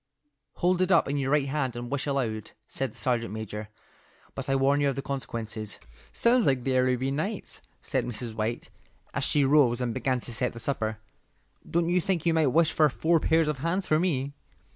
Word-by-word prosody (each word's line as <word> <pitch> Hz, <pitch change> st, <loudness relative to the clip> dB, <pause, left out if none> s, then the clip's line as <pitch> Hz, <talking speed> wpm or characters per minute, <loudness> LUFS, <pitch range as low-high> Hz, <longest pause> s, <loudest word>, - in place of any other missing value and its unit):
"Hold 180 Hz, +1 st, +1 dB
it 185 Hz, +1 st, +2 dB
up 170 Hz, -, +5 dB
in 140 Hz, +1 st, -1 dB
your 135 Hz, -1 st, -1 dB
right 145 Hz, -1 st, +2 dB
hand 135 Hz, -4 st, -1 dB
and 120 Hz, 0 st, -6 dB
wish 140 Hz, +1 st, -1 dB
aloud," 115 Hz, -7 st, -2 dB
said 135 Hz, +1 st, -3 dB
the -, -, -16 dB
sergeant 120 Hz, -4 st, -1 dB
major, 105 Hz, -1 st, -6 dB, 0.6 s
"but 135 Hz, 0 st, -5 dB
I 135 Hz, -, +3 dB
warn 140 Hz, +2 st, +3 dB
you 140 Hz, -, +3 dB
of 135 Hz, -, -2 dB
the 140 Hz, -, -4 dB
consequences." 110 Hz, -6 st, -4 dB, 0.3 s
"Sounds 235 Hz, -, +3 dB
like 130 Hz, -3 st, +2 dB
the 130 Hz, 0 st, 0 dB
Arabian 130 Hz, +2 st, +1 dB
Nights," 195 Hz, +6 st, -3 dB, 0.2 s
said -, -, -1 dB
Mrs. 120 Hz, -1 st, -3 dB
White, 110 Hz, +2 st, -3 dB, 0.4 s
as -, -, -1 dB
she 145 Hz, -2 st, +3 dB
rose 135 Hz, -4 st, +4 dB
and 125 Hz, -2 st, -1 dB
began 130 Hz, +1 st, 0 dB
to 120 Hz, -, -4 dB
set 125 Hz, +2 st, 0 dB
the 115 Hz, -, -8 dB
supper. 110 Hz, -4 st, -2 dB, 0.7 s
"Don't 170 Hz, 0 st, +1 dB
you 180 Hz, +1 st, +3 dB
think 180 Hz, -3 st, -1 dB
you 165 Hz, -, +3 dB
might 160 Hz, -2 st, +3 dB
wish 160 Hz, +5 st, +3 dB
for 155 Hz, -1 st, +4 dB
four 165 Hz, +5 st, +2 dB
pairs 160 Hz, 0 st, +2 dB
of 150 Hz, -3 st, -1 dB
hands 175 Hz, +6 st, 0 dB
for 155 Hz, -, +2 dB
me?" 140 Hz, -6 st, 0 dB
135 Hz, 205 wpm, -27 LUFS, 120-155 Hz, 0.7 s, up